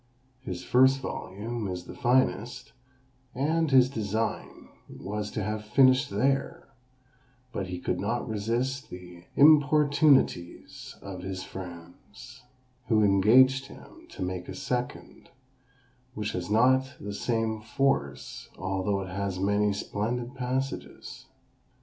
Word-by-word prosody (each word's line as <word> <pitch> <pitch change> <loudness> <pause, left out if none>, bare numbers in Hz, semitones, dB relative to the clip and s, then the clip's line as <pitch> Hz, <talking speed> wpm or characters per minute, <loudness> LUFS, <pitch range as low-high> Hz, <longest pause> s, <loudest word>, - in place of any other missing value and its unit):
His 90 -7 -6
first 130 +5 +4
volume 110 -1 -5
is 90 -1 -5
the - - -9
finest; 125 +1 0 0.6
and 160 +4 +1
his 130 -2 +6
design 110 -3 -3 0.2
was 105 +1 -5
to 110 - -4
have 105 +1 -3
finished 130 +5 +4
there: 135 +7 -1 0.8
but 95 - -3
he 90 0 -5
could - - -2
not - - -2
resist 120 +5 -2
the 90 -1 -11
importunities 145 - +3
of 95 -2 -7
his 95 0 -5
friends, 95 +8 -11 0.5
who 110 -2 +3
engaged 125 +7 +5
him - - -15
to - - -6
make 90 -1 -4
a - - -6
second, 125 -3 -5 0.9
which 105 0 -3
has 90 0 -4
not 130 +4 +3
the 100 0 -6
same 110 0 -1
force, 110 - -2
although 95 +2 -1
it 95 - -6
has 95 0 -3
many 100 +1 +2
splendid 120 +5 -3
passages. 130 0 -5
110 Hz, 120 wpm, -27 LUFS, 95-130 Hz, 0.9 s, his